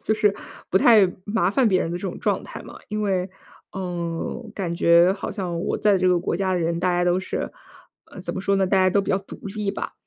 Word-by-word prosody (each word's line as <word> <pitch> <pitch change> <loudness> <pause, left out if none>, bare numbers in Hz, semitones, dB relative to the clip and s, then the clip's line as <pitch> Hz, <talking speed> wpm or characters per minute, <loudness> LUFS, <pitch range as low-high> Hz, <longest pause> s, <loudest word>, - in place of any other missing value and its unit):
就 215 - +2
是 210 -2 +2 0.3
不 - - +1
太 205 -2 +6
麻 205 -4 +1
烦 240 +2 +3
别 185 -2 +2
人 165 - -2
的 175 - -2
这 - - -7
种 - - -7
状 - - 0
态 - - -9
嘛。 - - -11
因 210 0 -2
为， 190 -2 0 0.4
呃， 175 +3 -4
感 175 -4 -3
觉 170 +2 +5
好 195 - -5
像 180 -4 -3
我 - - -2
在 205 -2 +3
这 185 0 +2
个 180 -1 +3
国 170 - -2
家 190 0 0
的 180 - +1
人， 170 0 -1
大 180 - +2
家 175 0 +1
都 180 +1 +2
是， - - -4 0.5
呃， - - -11
怎 - - -5
么 190 - -3
说 195 0 +1
呢， 190 - +2
大 195 - +2
家 185 0 +4
都 200 - +3
比 195 - -3
较 190 - +2
独 195 - -11 0.2
立 205 -2 -1
吧。 - - -5
185 Hz, 275 characters per minute, -23 LUFS, 175-200 Hz, 0.5 s, 太